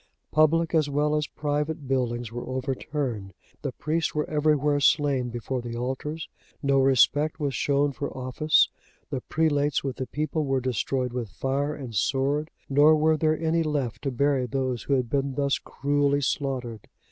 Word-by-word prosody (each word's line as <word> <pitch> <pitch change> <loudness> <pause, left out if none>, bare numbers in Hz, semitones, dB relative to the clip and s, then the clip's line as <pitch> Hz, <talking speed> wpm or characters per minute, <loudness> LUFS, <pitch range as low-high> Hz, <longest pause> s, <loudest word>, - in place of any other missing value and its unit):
Public 165 +2 +3
as 155 -3 +3
well 150 +1 +1
as 150 -1 0
private 150 0 -2
buildings 120 -3 -1
were 120 +1 -6
overturned; 130 - -3 0.3
the 140 - -3
priests 155 +6 -2
were 150 - 0
everywhere 150 -1 +2
slain 140 -4 +2
before 120 +2 -3
the 120 -1 -6
altars; 135 +6 -4 0.4
no 140 -1 +3
respect 135 +4 +3
was 145 -3 -1
shown 140 +4 +1
for 140 +1 -4
office, 130 +4 +3 0.4
the 135 -3 -2
prelates 145 -2 +1
with 135 -2 -3
the 130 - -3
people 155 +2 -2
were 135 -2 +1
destroyed 125 0 -1
with 120 -4 -3
fire 140 +6 -1
and 130 -5 -7
sword; 140 +8 0 0.2
nor 145 +3 +6
were 155 +1 +3
there 155 0 +1
any 165 +1 +1
left 145 -7 -2
to 140 - -1
bury 135 0 +1
those 130 -2 -2
who 140 - -1
had 130 -3 +1
been 135 +1 -1
thus 140 -1 +1
cruelly 145 0 0
slaughtered. 130 -5 -2
140 Hz, 165 wpm, -26 LUFS, 130-150 Hz, 0.4 s, nor